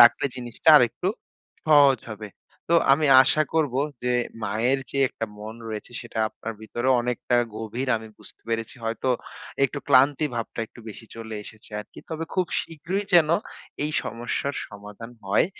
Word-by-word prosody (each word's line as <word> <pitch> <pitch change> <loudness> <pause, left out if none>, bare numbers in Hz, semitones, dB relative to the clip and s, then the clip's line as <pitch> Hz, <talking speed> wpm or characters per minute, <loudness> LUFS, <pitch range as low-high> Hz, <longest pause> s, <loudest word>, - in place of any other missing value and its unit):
রাখলে 120 +3 +7
জিনিসটা 120 +4 -3
আরেকটু 135 +8 +3 0.6
সহজ 140 -5 +6
হবে। 105 0 -7 0.4
তো - - +5 0.2
আমি 150 +2 +3 0.2
আশা 155 +4 +3
করব 150 -6 +1 0.3
যে 125 0 +1 0.3
মায়ের 115 +6 +1
যে 140 - -3
একটা 115 - -5
মন 110 +1 -7
রয়েছে, 110 +2 -6
সেটা 120 -2 -7
আপনার 110 +1 -7
ভেতরেও 120 +4 0
অনেকটা 125 0 0 0.2
গভীর, 115 +4 -4
আমি 110 0 -8
বুঝতে - - -12
পেরেছি। 115 +1 -2
হয়তো 115 +3 -2 0.6
একটু 140 +1 -1
ক্লান্তি 140 +2 +5
ভাবটা 115 0 -4
একটু 120 - -16
বেশি 110 +1 -10
চলে 110 -1 -7
এসেছে 110 0 -12
আরকি! 105 - -14
তবে 160 +1 -3
খুব 185 -2 +2
শীঘ্রই 165 +5 -4
যেন 165 -3 +7 0.6
এই 150 - -1
সমস্যার 120 +5 -3
সমাধান 105 +3 -10
হয়। 100 +10 +3
120 Hz, 155 wpm, -25 LUFS, 110-140 Hz, 0.6 s, রাখলে